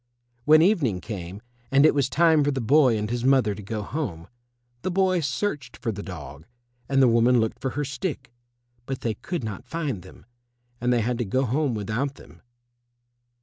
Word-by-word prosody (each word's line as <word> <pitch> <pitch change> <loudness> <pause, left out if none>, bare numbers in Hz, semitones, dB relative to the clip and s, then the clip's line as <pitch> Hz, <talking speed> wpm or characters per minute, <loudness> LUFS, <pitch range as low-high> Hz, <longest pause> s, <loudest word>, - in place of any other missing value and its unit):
When 155 +1 +7
evening 150 - +2
came, 95 -1 -7 0.3
and 140 +3 +5
it 155 - +6
was 140 -3 +1
time 160 -1 +4
for 145 - +1
the 135 -2 -1
boy 130 0 +4
and 105 0 -2
his 120 +1 -3
mother 130 -5 +3
to 105 - -8
go 105 +1 -4
home, 95 - -4 0.5
the - - -2
boy 185 0 +2
searched 140 -2 -3
for 115 - -2
the 100 -1 -6
dog 80 -4 -9 0.4
and 135 -1 +4
the - - +6
woman 120 +1 +4
looked 110 -1 -1
for 135 - -2
her 145 - 0
stick, 135 -2 -5 0.5
but 135 -1 -4
they 115 - -1
could 170 - -5
not 105 -3 -6
find 150 - -3
them, 95 - -15 0.6
and 125 0 +1
they 120 -1 +3
had 120 +2 -1
to - - +1
go 130 +7 0
home 135 +1 0
without 110 +7 -2
them. - - -16
125 Hz, 190 wpm, -25 LUFS, 110-145 Hz, 0.6 s, When